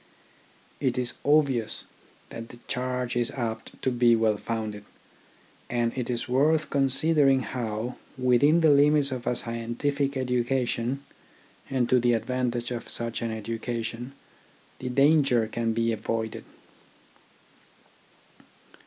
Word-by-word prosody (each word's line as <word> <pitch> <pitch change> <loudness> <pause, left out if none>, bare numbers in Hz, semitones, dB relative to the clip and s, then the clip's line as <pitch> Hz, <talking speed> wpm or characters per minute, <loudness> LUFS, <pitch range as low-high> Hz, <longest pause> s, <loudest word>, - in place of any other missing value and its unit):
It 130 -3 0
is 125 -1 -1
obvious 140 -6 +2 0.5
that 115 0 -8
the 120 - -12
charge 125 -1 -2
is 120 -1 +1
apt 115 -3 -5
to 130 - +2
be 120 -1 +4
well 110 -1 +2
founded; 110 -2 -4 0.9
and 120 -1 0
it 125 -2 -3
is 120 -1 -2
worth 150 +5 +2
considering 135 0 +3
how, 120 -1 -4 0.2
within 130 +6 +4
the 160 -2 +6
limits 145 0 +4
of 125 -2 -5
a 125 - +2
scientific 135 +5 -2
education 125 0 0 0.7
and 130 -3 +1
to 125 +1 +4
the 120 0 +3
advantage 120 +1 -1
of 120 -2 -5
such 115 -1 -4
an 115 - -1
education, 115 +3 -4 0.7
the 130 - -4
danger 140 -3 +4
can 115 +1 -1
be 115 +1 +1
avoided. 110 0 -3
125 Hz, 120 wpm, -27 LUFS, 115-135 Hz, 0.9 s, the